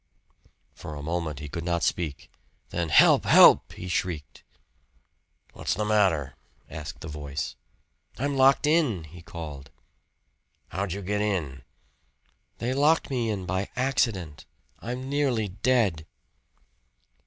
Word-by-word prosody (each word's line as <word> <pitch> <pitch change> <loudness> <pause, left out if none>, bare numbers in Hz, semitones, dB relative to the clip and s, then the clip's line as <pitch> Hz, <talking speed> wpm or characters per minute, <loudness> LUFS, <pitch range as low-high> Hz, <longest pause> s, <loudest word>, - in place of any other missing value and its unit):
For 75 - -8
a 70 - -7
moment 80 -2 -3
he 75 - -7
could 80 +3 -5
not 85 0 -1
speak. 75 -5 -2 0.4
Then 85 -1 -2
"Help! - - +6
Help!" - - +7
he 90 - -8
shrieked. 90 -4 -3 1.1
"What's - - -2
the 105 +3 -1
matter?" 95 -10 +2 0.3
asked 75 -1 -8
the - - -7
voice. 75 -2 -5 0.6
"I'm 140 +2 -1
locked 135 +2 +4
in," 150 - +2
he 85 +3 -12
called.. 75 -5 -8 1.0
"How'd 95 0 -3
you 100 0 -6
get 105 +2 -1
in?" 80 -11 -2 1.0
"They 120 +2 -2
locked 150 +3 +2
me 120 -4 0
in 100 -4 -3
by 95 +2 -2
accident. 115 - -1 0.3
I'm 125 +2 -5
nearly 135 -7 0
dead." 100 -6 +1
90 Hz, 125 wpm, -26 LUFS, 80-120 Hz, 1.1 s, Help